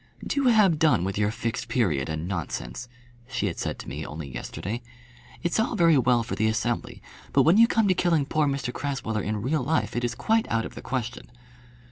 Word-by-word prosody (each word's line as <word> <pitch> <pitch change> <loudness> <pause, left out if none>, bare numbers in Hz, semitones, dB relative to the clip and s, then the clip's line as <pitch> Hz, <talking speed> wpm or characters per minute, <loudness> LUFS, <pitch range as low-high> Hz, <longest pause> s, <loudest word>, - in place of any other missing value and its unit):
"Do 280 -1 0
have 210 -10 +5
done 150 - +4
with 95 +1 -2
your 105 0 +2
Fixed 115 +2 -3
Period 95 - 0
and 80 +2 -3
nonsense," 85 - -4 0.4
she 130 -4 -2
had 95 - -3
said - - -2
to - - -9
me 70 +6 -5
only 75 -1 -6
yesterday. 110 - -5 0.6
"It's 175 +4 +1
all 225 +2 +1
very 170 -5 +5
well 125 -2 +3
for 115 - -5
the 110 - +1
Assembly; 115 +2 -2 0.3
but - - +5
when 170 +6 +5
you 230 +1 +7
come 225 -3 +2
to 190 - +4
killing 170 -5 +2
poor 150 +1 +1
Mr 135 -3 -2
Crasweller 130 -6 -2
in 105 0 -3
real 145 +4 +1
life, 155 +6 0
it 120 - -1
is 120 -1 -1
quite 220 - +1
out 115 0 0
of - - -7
the - - -8
question." 125 -1 -4
125 Hz, 210 wpm, -26 LUFS, 105-160 Hz, 0.6 s, you